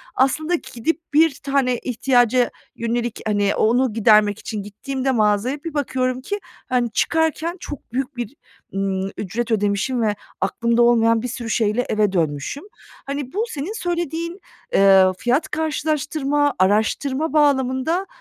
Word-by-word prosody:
aslında 310 +6 +2 0.2
gidip 320 +8 -1
bir 315 -1 +4
tane 270 -3 +1
ihtiyaca 245 0 +2 0.3
yönelik, 235 0 -2
hani, 205 -1 +1
o 215 - +3
onu 250 0 +2
gidermek 215 -1 +4
için 215 -3 -5
gittiğimde 265 +6 -3
mağazaya 225 +5 +1
bir 330 - -5
bakıyorum 255 -3 -1
ki, 410 +10 -3 0.3
hani, 245 -2 +1
çıkarken 320 +6 0
çok 290 -7 -9
büyük 265 +1 -3
bir, 240 +2 -5 0.4
ımm, 195 0 -1
ücret 230 +4 -3
ödemişim 210 +4 0
ve 210 -2 +1 0.3
aklımda 235 +5 +1
olmayan 230 -1 +4
bir 250 - -3
sürü 240 -1 -5
şeyle 220 +2 +1
eve 210 -2 +2
dönmüşüm. 160 - -2 0.4
Hani, 275 -2 -4
bu 420 +4 0
senin 320 +3 -4
söylediğin, 345 -2 -3 0.3
eee, 195 -1 +6
fiyat 270 - 0
karşılaştırma, 295 -2 0
araştırma 260 +10 +1
bağlamında, 285 +4 +2
250 Hz, 135 wpm, -21 LUFS, 220-290 Hz, 0.4 s, eee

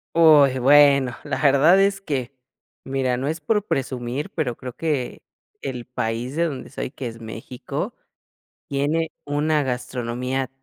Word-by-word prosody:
Uy, 150 -5 +6
bueno, 140 -1 +5
la 145 -2 -3
verdad 150 +6 +5
es 195 0 +2
que, 135 -7 -3 0.5
mira, 130 -2 0
no 135 - -2
es 160 +2 -3
por 210 +5 +1
presumir, 130 +1 -3
pero 130 -8 -2
creo 125 -2 -7
que 145 -6 -2 0.4
el 125 -3 -5
país 120 +2 -3
de 170 +1 +2
donde 135 -5 -5
soy, - - -4
que 130 0 -8
es 115 0 -7
México, 115 +2 -5 0.7
tiene 150 +4 0
una 150 +1 +1
gastronomía 125 0 -3
135 Hz, 140 wpm, -23 LUFS, 125-150 Hz, 0.7 s, Uy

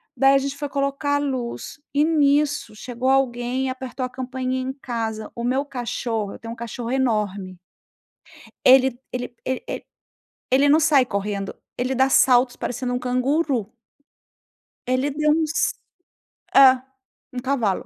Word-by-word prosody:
Daí 270 0 +5
a - - +6
gente 275 0 -2
foi 290 0 -4
colocar 280 +1 -1
a - - +3
luz, 260 0 -4
e 290 +1 +3
nisso 295 -5 +2
chegou 245 +3 -3
alguém 255 -1 +1
e - - -1
apertou 255 0 -4
a - - -5
campainha 255 0 -3
em 260 +1 -3
casa, 225 -5 -4
o 235 - -5
meu 260 +4 0
cachorro 235 -5 -3
eu - - -11
tenho 230 0 -7
um - - -9
cachorro 235 +1 -5
enorme. 210 -8 -1 1.1
Ele 260 -1 +6
ele 245 0 -4
ele 260 0 -2
ele - - -5 0.7
ele 275 +2 +4
não 305 +2 +6
sai 300 -5 +4
correndo, 200 -2 -3 0.2
ele 255 +2 -1
dá 265 +1 +3
saltos 250 -1 +4
parecendo 245 +1 -3
um 245 - -1
canguru. 255 -1 0 1.2
Ele 255 +3 +1
deu 300 +1 +1
uns 320 +1 +1 0.8
é, 270 -1 +9 0.6
um 250 - -3
cavalo. 240 -7 0
255 Hz, 150 wpm, -23 LUFS, 240-275 Hz, 1.2 s, é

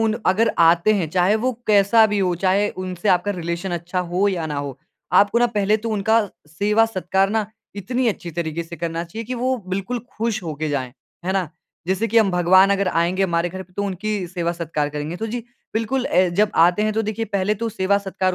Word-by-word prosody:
उन 220 -1 +2
अगर 220 +5 +3
आते 170 +5 +5
हैं 180 -6 -1
चाहे 185 +3 +3
वो 255 - +3 0.2
कैसा 210 +2 +5
भी 210 -1 -1
हो, 180 -2 +1
चाहे 195 +3 +1
उनसे 185 +1 -4
आपका 185 +2 +3
रिलेशन 170 +1 -4
अच्छा 175 +2 -2
हो 185 +3 +2
या 170 -4 -2
ना 150 - -4
हो, 140 -2 -5 0.3
आपको 205 +3 +4
ना 240 - +4
पहले 205 +1 +2
तो 225 +1 -5
उनका 220 +2 +2 0.3
सेवा-सत्कार 195 +1 +1
ना 220 -2 0 0.3
इतनी 245 +6 -1
अच्छी 175 -5 -4
तरीके 165 0 -3
से 170 +1 -10
करना 165 +1 -3
चाहिए 220 +7 -7
कि 255 - -3
वो 255 +2 0
बिल्कुल 195 +6 -2 0.2
खुश 220 -3 -1
होके 155 -2 -4
जाएँ, 130 -4 -2 0.3
है 190 - 0
ना? 190 -5 0 0.4
जैसे 190 +5 0
कि 230 +2 +4
हम 205 -3 +3
भगवान 185 +2 +5
अगर 200 -1 +1
आएँगे 175 +3 +1
हमारे 170 -1 0
घर 190 +2 -7
पे 180 - -22
तो 200 - -1
उनकी 200 0 -3
सेवा-सत्कार 170 -4 -2
करेंगे 150 +3 -5
तो 220 - -4
जी, 240 +2 -4 0.3
बिल्कुल 245 +4 0
अ, 185 0 +3
जब 205 +5 +1 0.2
आते 180 +4 -1
हैं 215 0 +1
तो 220 - 0
देखिए 225 +1 -3
पहले 200 0 0
तो 230 - 0
सेवा-सत्कार 190 -2 0
190 Hz, 210 wpm, -21 LUFS, 170-215 Hz, 0.4 s, आते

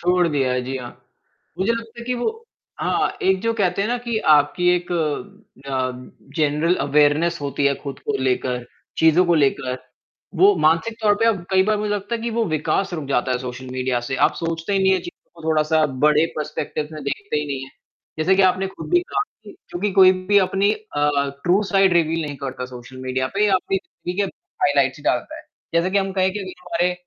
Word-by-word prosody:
छोड़ 180 0 +3
दिया 135 -4 +1
है, 125 0 0
जी 130 +1 -4
हाँ। 125 -2 -7 0.7
मुझे 195 +5 +2
लगता 230 0 -6
है - - -8
कि 250 - 0
वो 245 - 0 0.5
हाँ, - - 0
एक 190 0 +2
जो 230 0 +1
कहते 195 -3 +1
हैं 210 - -1
ना 245 - +1
कि 235 -2 -2 0.2
आपकी 150 +5 +2
एक 175 0 -6 0.8
अ, - - -6 0.7
जनरल 155 +3 +2
अवेयरनेस 150 +4 +3
होती 140 0 0
है 140 - +2
खुद 140 -2 -6
को 145 - 0
लेकर, 125 -1 -1 0.3
चीज़ों 160 +3 +5
को 175 - +3
लेकर। 135 -4 +1 0.6
वो 195 +3 +6
मानसिक 165 +9 +2
तौर 210 -1 +4
पे - - +3
अब 200 -6 +1
कई 190 0 +5
बार 215 +1 +2
मुझे 210 0 -2
लगता 205 +3 -3
है 230 - -3
कि 235 - -2
वो 230 0 0
विकास 165 +4 -1
रुक 155 -3 -4
जाता 130 -1 +1
है 125 - 0
सोशल 125 +1 -7
मीडिया 130 -1 -1
से। 130 - -2
आप - - -4
सोचते 165 +3 -3
ही 195 - +3
नहीं 190 0 +4
है 190 - +3
चीज़ों 175 - -12
को 160 - -4
थोड़ा-सा 155 0 +3 0.2
बड़े 150 +1 +4
पर्सपेक्टिव 150 0 -3
में 155 -1 -7
देखते 150 +4 -3
ही 150 - -1
नहीं 135 -2 -4
है। 135 - -14 0.5
जैसे 180 +5 +3
कि 195 - +5
आपने 185 +1 +3
खुद 190 - -9
भी 355 0 +5
कहा 365 +3 -2
था - - -12
कि 205 - -11 0.2
क्योंकि 200 +4 -2
कोई 185 -1 +7
भी 205 +1 +5
अपनी 195 +1 +2
अ, 150 -9 -1 0.3
ट्रू 185 +4 +3
साइड 195 -1 +4
रिवील 165 -1 +2
नहीं 145 -1 -6
करता 130 -1 -5
सोशल 125 0 -11
मीडिया 130 0 -1
पे 210 +1 +3
या 195 - +3
अपनी 190 +1 0
हकीकत 190 0 -4 0.3
हाइलाइट्स 140 -1 +2
डालता - - 0
है। - - -10 0.3
जैसे 170 +2 +2
कि 200 - +2
हम 195 0 -1
कहें 190 -1 +2
कि 210 - -4
अभी 190 -1 -6
जो 180 - -15
हमारे, 175 +1 +1
170 Hz, 220 wpm, -21 LUFS, 145-195 Hz, 0.8 s, कोई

